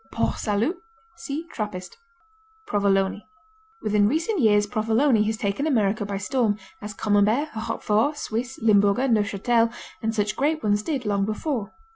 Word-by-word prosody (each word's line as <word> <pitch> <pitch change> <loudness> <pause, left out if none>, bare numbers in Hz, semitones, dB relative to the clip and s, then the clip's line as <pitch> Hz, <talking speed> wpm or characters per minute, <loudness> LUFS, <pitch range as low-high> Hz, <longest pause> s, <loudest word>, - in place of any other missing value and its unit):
Port 230 - -1
Salut 220 - 0 0.4
(See 325 -2 -5
Trappist) 195 -5 -5 0.7
Provolone 200 - +1 0.6
Within 210 -1 +3
recent 330 - 0
years 210 -2 +4
Provolone 225 +3 +2
has 220 +1 -1
taken 215 +8 -1
America 210 -6 +1
by 200 -1 -3
storm, 215 0 0 0.2
as 210 0 -7
Camembert, 215 +9 +2
Roquefort, 225 +4 0
Swiss, 245 +3 -4
Limburger, 205 +3 +4
Neufchâtel 230 +1 +2 0.3
and 225 0 -1
such 210 -1 0
great 305 +3 0
ones 205 0 +2
did 270 -1 -3
long 200 -1 +1
before. 215 +2 -3
215 Hz, 135 wpm, -24 LUFS, 205-255 Hz, 0.7 s, years